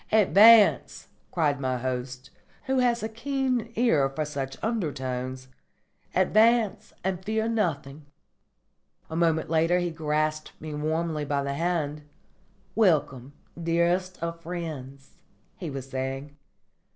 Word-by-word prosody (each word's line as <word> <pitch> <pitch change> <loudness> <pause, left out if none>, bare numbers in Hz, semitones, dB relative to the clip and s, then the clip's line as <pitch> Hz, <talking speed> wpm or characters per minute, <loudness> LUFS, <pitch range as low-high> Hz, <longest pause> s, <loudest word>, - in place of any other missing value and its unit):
"Advance," 215 +1 +5 0.2
cried 150 -5 +1
my 130 -2 -1
host, 130 +1 -5 0.3
who 265 0 0
had 240 -2 +2
a - - 0
keen 250 0 -2
ear 160 - +3
for 150 +3 -3
such 135 -2 -5
undertones. 130 - -3 0.7
"Advance 220 +3 +3
and 190 -1 -2
fear 220 +2 -1
nothing." 155 -10 -2 1.0
A - - -4
moment 165 -1 +1
later 165 +2 +3
he 175 -1 -1
grasped 155 -1 -2
me 155 -1 -7
warmly 155 +1 -1
by 140 -1 -1
the 140 0 -2
hand, 155 -2 -1 0.7
"Welcome, 145 - +1 0.3
dearest 175 +2 +1
of 170 0 -4
friends," 155 -6 -7 0.4
he 175 - -5
was 135 -2 -6
saying. 135 +2 -5
160 Hz, 115 wpm, -26 LUFS, 140-190 Hz, 1.0 s, Advance